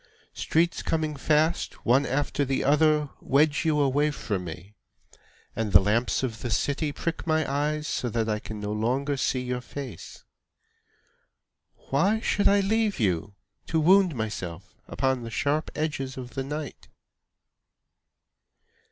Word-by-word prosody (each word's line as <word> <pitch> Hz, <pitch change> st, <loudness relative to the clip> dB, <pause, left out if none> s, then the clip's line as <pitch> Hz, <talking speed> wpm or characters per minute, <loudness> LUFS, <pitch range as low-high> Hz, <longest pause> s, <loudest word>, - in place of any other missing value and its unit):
Streets 170 Hz, +2 st, +1 dB
coming 155 Hz, -2 st, -1 dB
fast, 155 Hz, +4 st, 0 dB
One 130 Hz, +4 st, +4 dB
after 145 Hz, +2 st, 0 dB
the 135 Hz, -1 st, -1 dB
other, 150 Hz, +1 st, +3 dB
Wedge 145 Hz, +2 st, +2 dB
you 155 Hz, -2 st, +2 dB
away 145 Hz, +2 st, +2 dB
from 100 Hz, -10 st, -3 dB
me, 90 Hz, +5 st, -9 dB, 0.8 s
And 110 Hz, -3 st, -2 dB
the 90 Hz, -, +10 dB
lamps 110 Hz, +7 st, +1 dB
of 115 Hz, -4 st, -3 dB
the 120 Hz, -, -3 dB
city 145 Hz, +7 st, 0 dB
prick 165 Hz, +3 st, -4 dB
my 160 Hz, 0 st, +2 dB
eyes 150 Hz, +2 st, -1 dB
So 125 Hz, -, -2 dB
that 115 Hz, -1 st, -1 dB
I 105 Hz, -1 st, 0 dB
can 110 Hz, 0 st, -7 dB
no 105 Hz, 0 st, -4 dB
longer 130 Hz, +7 st, 0 dB
see 130 Hz, -1 st, 0 dB
your 125 Hz, 0 st, -3 dB
face. 125 Hz, -, -8 dB, 1.7 s
Why 195 Hz, +11 st, +3 dB
should 210 Hz, -2 st, +1 dB
I 200 Hz, 0 st, +5 dB
leave 215 Hz, -1 st, +1 dB
you, 100 Hz, -2 st, 0 dB, 0.3 s
To 160 Hz, -, +1 dB
wound 180 Hz, 0 st, +5 dB
myself 95 Hz, -5 st, -5 dB
upon 130 Hz, -2 st, 0 dB
the 115 Hz, -, -6 dB
sharp 145 Hz, +7 st, 0 dB
edges 135 Hz, -4 st, -3 dB
of 125 Hz, -1 st, -7 dB
the 135 Hz, -, -2 dB
night? 150 Hz, +1 st, -6 dB
140 Hz, 145 wpm, -26 LUFS, 115-155 Hz, 1.7 s, the